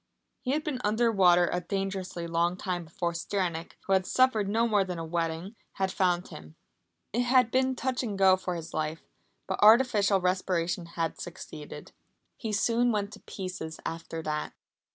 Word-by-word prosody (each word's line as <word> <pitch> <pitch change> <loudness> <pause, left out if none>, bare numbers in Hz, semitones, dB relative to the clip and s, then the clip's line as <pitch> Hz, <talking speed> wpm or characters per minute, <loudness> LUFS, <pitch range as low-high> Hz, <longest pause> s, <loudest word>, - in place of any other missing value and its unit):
He 260 0 -1
had 305 +1 0
been 285 -6 -3
under 225 +3 +2
water 180 -4 +5
a 180 - 0
dangerously 190 -1 -3
long 170 +2 0
time 180 -3 -3
before 170 +1 -3
Stranack, 170 -1 -2
who 195 - +1
had 190 -1 +2
suffered 230 -6 +3
no 230 +3 +2
more 210 -3 +3
than 180 -2 -5
a 165 - -4
wetting, 165 +4 -3 0.2
had 190 0 -1
found 180 -1 +1
him. 75 0 -11 0.6
It 240 - +2
had 250 -1 +4
been 260 0 +2
touch 255 0 -1
and 215 -6 -3
go 190 -1 +6
for 185 -1 -4
his 165 -1 -7
life, 155 +1 -2 0.4
but 190 - -3
artificial 215 -3 +6
respiration 180 -2 0
had 165 -1 -2
succeeded. 155 -4 -9 0.4
He 225 - -4
soon 235 +3 +2
went 205 -1 -2
to 210 - -10
pieces 185 -4 -6
after 165 0 -5
that. 150 -1 -3
190 Hz, 175 wpm, -29 LUFS, 170-215 Hz, 0.6 s, go